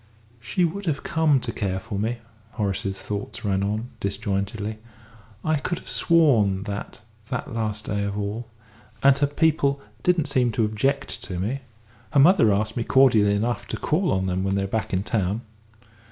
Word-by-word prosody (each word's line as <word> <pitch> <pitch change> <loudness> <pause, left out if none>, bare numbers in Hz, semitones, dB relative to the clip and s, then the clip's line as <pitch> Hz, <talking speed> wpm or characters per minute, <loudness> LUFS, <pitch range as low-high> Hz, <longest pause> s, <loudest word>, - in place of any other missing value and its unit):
"She 145 +10 0
would 190 +3 -4
have 145 -3 -1
come 160 -4 +3
to - - -3
care 95 -3 -2
for 100 0 -5
me," 115 +3 -1 0.4
Horace's 100 -1 -2
thoughts 105 0 -5
ran 95 -1 +1
on, 105 +4 -2
disjointedly. 100 +2 -2 0.7
"I 155 -1 +2
could 170 +4 -2
have - - -12
sworn 115 - +3
that 100 +1 -6 0.3
that 130 +1 -4
last 110 -2 -2
day 100 -1 -1
of 100 0 -3
all 105 +3 -3 0.6
and 135 0 +7
her 145 - +3
people 145 -2 +2 0.2
didn't 175 -1 +2
seem 130 -4 +2
to 110 0 +2
object 135 +7 -1
to 90 - -5
me. 110 +10 -2 0.5
Her 145 - +5
mother 140 - +6
asked 105 +2 0
me 120 - 0
cordially 115 -6 +5
enough 115 +3 -1
to - - -3
call 175 +5 +1
on 95 0 +1
them 95 0 -1
when 95 0 0
they 100 - +1
were - - -2
back 110 +2 -2
in 95 0 0
town. 105 -1 -1
110 Hz, 180 wpm, -24 LUFS, 100-140 Hz, 0.7 s, and